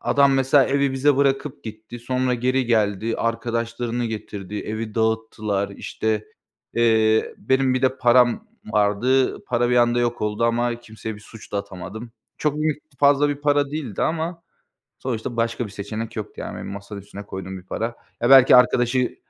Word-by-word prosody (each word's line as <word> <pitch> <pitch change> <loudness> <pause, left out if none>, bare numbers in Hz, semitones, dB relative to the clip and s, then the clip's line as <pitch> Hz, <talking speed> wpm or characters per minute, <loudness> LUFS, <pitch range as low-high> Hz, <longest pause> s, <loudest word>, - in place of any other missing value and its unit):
A - - -2
adam 140 -1 +5
mesela 135 +1 +4
evi 140 0 +1
bize 140 +1 +2
bırakıp 140 -1 0
gitti. 110 +2 -9
Sonra 125 +1 0
geri 130 +1 0
geldi. 110 -1 +1
Arkadaşlarını 115 +1 -2
getirdi. 105 -3 -6
Evi 110 0 -5
dağıttılar. 110 -3 -1
İşte, 110 +1 -3 0.5
eee, 110 -1 +3
benim 130 -1 +2
bir 130 - -1
de 130 0 +2
param 125 - +4 0.3
vardı. 110 +6 +2
Para 120 0 0
bir 125 - +3
anda 120 0 +3
yok 120 0 -1
oldu 105 +2 0
ama 120 0 0
kimseye 110 -1 -7
bir 105 - -13
suç 110 0 -14
da 100 - 0
atamadım. 100 +4 -8 0.3
Çok 150 -1 0
büyük, 155 -1 -1 0.2
fazla 145 +1 +4
bir 145 - -1
para 145 -1 +2
değildi 145 -10 -4
ama 165 +1 -2 0.6
sonuçta 120 -1 -4
başka 115 +1 0
bir - - -11
seçenek 110 +3 -6
yoktu - - -5
yani - - -6
benim - - -7
masanın 100 +1 -7
üstüne 100 +1 -10
koyduğum 95 0 -6
bir - - -13
para. 105 - -4 0.4
Ya, 120 - +2
belki 135 -2 +9
arkadaşı, 125 0 +3
120 Hz, 170 wpm, -22 LUFS, 110-130 Hz, 0.6 s, belki